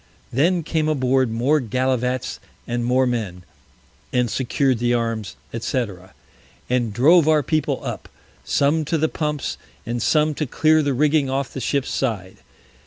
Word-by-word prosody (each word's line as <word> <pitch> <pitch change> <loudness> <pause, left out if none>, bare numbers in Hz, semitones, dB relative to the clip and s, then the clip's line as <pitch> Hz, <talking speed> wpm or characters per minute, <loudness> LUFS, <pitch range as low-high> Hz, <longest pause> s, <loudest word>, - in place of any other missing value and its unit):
Then 170 +7 +2
came 155 0 0
aboard 130 -3 +2
more 125 +7 +2
Gallivats 130 +1 -1 0.3
and 120 0 -1
more 125 +2 +2
Men, 105 -8 -3 0.7
and 125 -3 +1
secured 130 -1 +1
the 120 0 +2
Arms, 115 -3 -2 0.2
&c. 120 +2 -1 0.9
and 120 -3 +1
drove 150 - +5
our 155 -2 +4
People 155 +3 0
up, - - -5 0.3
some 150 +3 +2
to 165 - 0
the 160 +1 +2
Pumps, 150 -2 -3 0.3
and 120 +1 -3
some 155 +4 +2
to 150 0 -3
clear 155 +4 +3
the 140 -3 0
Rigging 150 0 +2
off 135 0 -2
the 135 - -5
Ship's 140 +3 -1
Side. 100 -8 -2
130 Hz, 150 wpm, -22 LUFS, 120-150 Hz, 0.9 s, drove